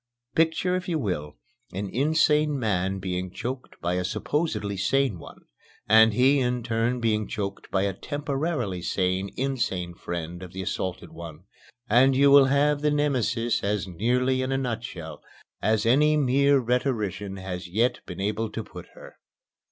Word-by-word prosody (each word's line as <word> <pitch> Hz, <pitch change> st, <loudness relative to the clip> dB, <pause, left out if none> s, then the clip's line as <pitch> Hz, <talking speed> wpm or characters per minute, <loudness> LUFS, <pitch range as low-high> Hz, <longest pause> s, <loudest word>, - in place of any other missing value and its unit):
Picture, 165 Hz, +3 st, +2 dB
if 185 Hz, 0 st, -3 dB
you 165 Hz, -, +1 dB
will, 90 Hz, -, -3 dB, 0.4 s
an 100 Hz, +2 st, -3 dB
insane 150 Hz, +4 st, +2 dB
man 95 Hz, -5 st, 0 dB
being 90 Hz, -1 st, -3 dB
choked 125 Hz, +7 st, -6 dB
by 85 Hz, +1 st, -1 dB
a 90 Hz, 0 st, 0 dB
supposedly 105 Hz, -, -2 dB
sane 120 Hz, 0 st, +1 dB
one, -, -, -12 dB, 0.5 s
and 110 Hz, 0 st, +6 dB
he 135 Hz, +4 st, +4 dB
in 125 Hz, -1 st, 0 dB
turn 115 Hz, +2 st, 0 dB
being 110 Hz, -2 st, 0 dB
choked 100 Hz, -2 st, -5 dB
by 95 Hz, 0 st, +1 dB
a 100 Hz, -1 st, 0 dB
temporarily 145 Hz, -, -3 dB
sane 95 Hz, +2 st, -1 dB
insane 115 Hz, -10 st, -2 dB
friend 85 Hz, 0 st, -6 dB
of 90 Hz, -1 st, -9 dB
the 95 Hz, -, -5 dB
assaulted 95 Hz, 0 st, -4 dB
one, 85 Hz, -1 st, -10 dB, 0.4 s
and 130 Hz, +4 st, +5 dB
you 140 Hz, +1 st, +5 dB
will 140 Hz, -1 st, +8 dB
have 145 Hz, +2 st, +2 dB
Nemesis 130 Hz, -6 st, +1 dB
as 100 Hz, -1 st, -1 dB
nearly 125 Hz, +8 st, +1 dB
in 130 Hz, +1 st, -2 dB
a 135 Hz, -, +1 dB
nutshell 115 Hz, -10 st, -5 dB, 0.4 s
as 110 Hz, +1 st, +1 dB
any 150 Hz, +6 st, +4 dB
mere 140 Hz, 0 st, +3 dB
rhetorician 115 Hz, -6 st, -1 dB
has 95 Hz, -1 st, -6 dB
yet 115 Hz, +7 st, +1 dB
been 90 Hz, -1 st, -7 dB
able 105 Hz, +3 st, -1 dB
to 110 Hz, +1 st, -5 dB
put -, -, -11 dB
her. -, -, -13 dB
115 Hz, 155 wpm, -26 LUFS, 95-135 Hz, 0.5 s, will